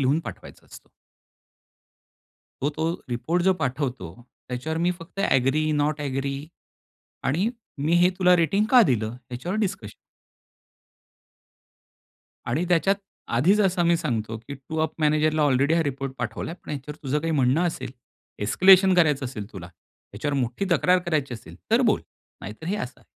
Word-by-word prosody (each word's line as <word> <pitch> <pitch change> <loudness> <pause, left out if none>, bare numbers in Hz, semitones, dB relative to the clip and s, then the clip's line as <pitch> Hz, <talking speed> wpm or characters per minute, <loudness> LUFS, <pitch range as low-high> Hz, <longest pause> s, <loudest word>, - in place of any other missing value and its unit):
लिहून 140 +4 +2
पाठवायचा - - -10
असतो. - - -15 1.7
हो 145 - +1
तो 160 +2 -1 0.2
रिपोर्ट 165 +9 0
जो 190 0 +4
पाठवतो, 125 - -3 0.3
त्याच्यावर 150 +6 -3
मी 175 +1 +2
फक्त 175 +4 -8
ॲग्री, 135 +4 +2
नॉट 145 0 0
ॲग्री 140 -1 -2 0.9
आणि 175 - +1 0.3
मी 150 +4 0
हे 180 - +6
तुला 180 -1 +6
रेटिंग 195 +5 +2
का 250 -2 +8
दिलं? 110 - 0 0.2
याच्यावर 175 - -3
डिस्कशन. 190 - -3 2.5
आणि 140 +9 0
त्याच्यात 180 +3 +3 0.4
आधीचं 195 - +4
असं 180 -1 -1
आम्ही 170 0 +4
सांगतो, 115 -8 -2
की 115 +6 -9
टू 135 +4 -8
अप 160 - -1
मॅनेजरला 155 0 +2
ऑलरेडी 140 +2 +3
हा 165 - +3
रिपोर्ट 135 -2 -3
पाठवला 115 +4 -4
आहे. 170 - -8
पण - - -8
ह्याच्यावर 150 +1 -6
तुझं 145 +1 0
काही 165 +2 -2
म्हणणं 135 +3 +2
असेल, 160 -6 -4 0.5
एस्केलेशन 190 - +6
करायचं 150 -6 +3
असेल 110 -4 -7
तुला, 90 -4 -8
ह्याच्यावर 105 - -7
मोठी 125 +8 -1
तक्रार 180 +3 +4
करायची 145 -6 -1
असेल, 85 -6 -12
तर - - +4
बोल - - +3 0.4
नाहीतर 110 +11 -8
हे 200 - -1
असं 125 -8 -6
आहे. - - -25
150 Hz, 155 wpm, -25 LUFS, 130-170 Hz, 2.5 s, का